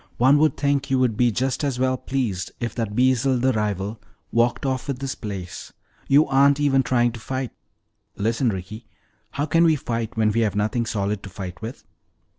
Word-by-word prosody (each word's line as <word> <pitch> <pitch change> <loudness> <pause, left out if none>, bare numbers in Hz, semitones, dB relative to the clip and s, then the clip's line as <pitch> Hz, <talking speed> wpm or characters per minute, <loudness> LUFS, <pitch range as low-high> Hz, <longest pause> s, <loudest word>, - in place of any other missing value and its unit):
One 135 +4 +5
would 155 0 +3
think 140 -1 0
you 135 - +2
would 125 -4 +2
be 120 +1 +3
just 130 +5 -1
as 140 -3 -1
well 130 0 +1
pleased 125 -9 -3
if 120 -3 -3
that 110 -3 -3
Beezel 130 +1 +3
the 130 +1 +2
rival 105 0 -2 0.3
walked 120 +3 +1
off 130 -2 -2
with 140 -3 -2
this 135 0 -3
place. 95 -5 -7 0.3
You 145 +3 +5
aren't 140 +1 +4
even 140 -2 +3
trying 120 -2 +2
to 115 - -9
fight!" 130 +2 -4 0.7
"Listen, 115 +4 +1
Ricky, 105 +3 -6 0.4
how 140 +6 -2
can 165 +2 +3
we 160 -2 +5
fight 115 -5 -4
when 110 -1 +3
we 115 - 0
have 105 -4 +1
nothing 110 +3 0
solid 100 -1 -1
to 100 - -9
fight 90 -2 -8
with? 115 +3 -7
120 Hz, 195 wpm, -23 LUFS, 110-135 Hz, 0.7 s, One